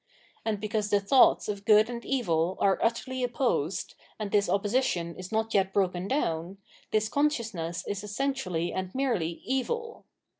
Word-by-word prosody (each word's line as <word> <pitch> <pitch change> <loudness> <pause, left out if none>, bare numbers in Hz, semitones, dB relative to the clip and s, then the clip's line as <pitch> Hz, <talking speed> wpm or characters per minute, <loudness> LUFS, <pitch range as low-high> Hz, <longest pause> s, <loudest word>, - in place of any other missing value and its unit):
And 215 -2 -1
because 210 0 -1
the 205 - +4
thoughts 245 +6 +5
of 200 -1 -4
good 215 +1 +6
and 235 -1 -6
evil 180 -9 0
are 195 -1 +3
utterly 255 +3 -1
opposed, 240 - -1 0.2
and 210 -2 -4
this 200 -3 +2
opposition 200 -4 0
is 185 +2 -8
not 220 0 0
yet 195 -1 +2
broken 185 -2 0
down, 175 - -1 0.3
this 215 0 +1
consciousness 220 - -1
is 200 0 -3
essentially 210 -7 -2
and 185 +2 -4
merely 220 -12 -1
evil. 460 - -2
210 Hz, 150 wpm, -28 LUFS, 185-245 Hz, 0.3 s, good